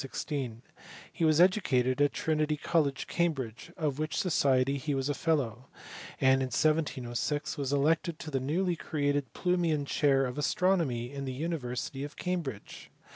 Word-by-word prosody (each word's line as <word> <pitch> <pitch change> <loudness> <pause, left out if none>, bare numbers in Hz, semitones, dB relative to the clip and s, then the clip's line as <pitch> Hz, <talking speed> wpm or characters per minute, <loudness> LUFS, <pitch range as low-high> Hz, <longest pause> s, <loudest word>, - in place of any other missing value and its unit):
Hi; 140 -4 -1 0.7
was 155 -1 +4
educated 145 - +3
at 145 - +4
Trinity 155 -1 0
College, 145 -2 0
Cambridge, 145 -5 -2
of 150 -4 -1
which 155 0 -2
society 140 -5 +2
he 145 +1 -2
was 135 +1 -1
a - - +1
fellow, 135 -6 -1 0.5
and 130 0 +4
in 130 - 0
1700 145 -1 0
was 140 -3 -2
elected 155 +3 +1
to 155 - -7
the 135 - 0
nowly 170 +7 0
created 145 -5 -1
Plumian 170 -5 +1
chair 140 -2 +2
of 125 +3 -4
astronomy 150 -8 +1
in 140 -1 -4
the 130 - -3
university 135 -3 -3
of 145 - -7
Cambridge. 165 - -4
145 Hz, 145 wpm, -30 LUFS, 130-160 Hz, 0.7 s, was